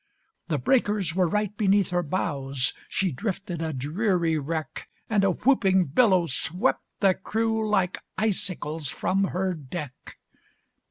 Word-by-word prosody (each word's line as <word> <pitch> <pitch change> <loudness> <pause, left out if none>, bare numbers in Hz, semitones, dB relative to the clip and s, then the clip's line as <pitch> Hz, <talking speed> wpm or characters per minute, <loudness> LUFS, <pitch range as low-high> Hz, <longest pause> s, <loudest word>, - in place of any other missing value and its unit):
The - - 0
breakers 210 -9 +1
were 185 -2 +3
right 210 +2 -1
beneath 200 -2 +2
her 175 0 +2
bows, 140 -6 -1 0.2
She 185 -1 0
drifted 190 - -4
a 160 -1 -1
dreary 165 - 0
wreck, 155 0 -4 0.2
And 210 -3 +2
a 195 - +4
whooping 190 - +3
billow 190 -6 +5
swept 180 - 0 0.2
the 195 -2 +5
crew 220 +2 -1
Like 190 -3 +1 0.2
icicles 175 - -2
from 195 +8 0
her 185 0 -1
deck. 150 -3 -8
185 Hz, 130 wpm, -26 LUFS, 160-205 Hz, 0.2 s, billow